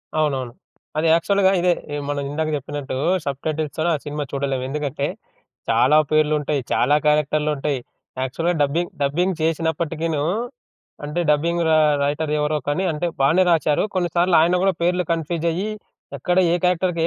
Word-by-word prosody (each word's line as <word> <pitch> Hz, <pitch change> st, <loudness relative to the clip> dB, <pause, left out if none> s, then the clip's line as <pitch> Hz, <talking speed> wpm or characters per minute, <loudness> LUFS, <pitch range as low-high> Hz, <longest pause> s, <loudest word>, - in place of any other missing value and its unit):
అవునవును. 135 Hz, -6 st, 0 dB, 0.5 s
అది 160 Hz, +1 st, +2 dB
యాక్చువల్‌గా 190 Hz, +3 st, +3 dB
ఇదే! 180 Hz, 0 st, +3 dB, 0.4 s
మనమిందాక 145 Hz, +2 st, -2 dB
చెప్పినట్టు 140 Hz, -1 st, -5 dB, 0.3 s
సబ్‌టైటిల్స్‌ 150 Hz, +2 st, -3 dB
తోనే 165 Hz, +2 st, +1 dB
ఆ -, -, -2 dB
సినిమా 150 Hz, 0 st, -3 dB
చూడలేము. 135 Hz, -2 st, -2 dB
ఎందుకంటే 145 Hz, -1 st, -2 dB, 0.6 s
చాలా 125 Hz, +6 st, +4 dB
పేర్లు 155 Hz, 0 st, +3 dB
ఉంటాయి. 145 Hz, -1 st, -1 dB
చాలా 145 Hz, -, +3 dB
క్యారెక్టరులుంటాయి. 150 Hz, -2 st, +1 dB, 0.4 s
యాక్చువల్‌గా 165 Hz, +7 st, -1 dB
డబ్బింగ్ 165 Hz, +5 st, -1 dB
డబ్బింగ్ 175 Hz, +6 st, 0 dB
చేసినప్పటికీను 160 Hz, -1 st, -1 dB, 0.8 s
అంటే 150 Hz, +4 st, -2 dB
డబ్బింగ్ 170 Hz, +3 st, +1 dB
ర -, -, +3 dB, 0.3 s
రైటర్ 150 Hz, +1 st, -1 dB
ఎవరో 150 Hz, +1 st, 0 dB
కానీ 180 Hz, +6 st, 0 dB
అంటే 155 Hz, +3 st, -2 dB
బానే 160 Hz, +7 st, +4 dB
రాశారు 155 Hz, -3 st, +2 dB
కొన్నిసార్లు 175 Hz, 0 st, +2 dB
ఆయన 175 Hz, +2 st, +3 dB
కూడా 195 Hz, -, +3 dB
పేర్లు 180 Hz, +1 st, +1 dB
కన్ఫ్యూజయ్యి 170 Hz, +4 st, -1 dB, 0.5 s
ఎక్కడ 180 Hz, -1 st, -1 dB, 0.2 s
ఏ -, -, +3 dB
క్యారెక్టర్‌కి 180 Hz, -1 st, +1 dB
155 Hz, 135 wpm, -21 LUFS, 145-170 Hz, 0.8 s, చాలా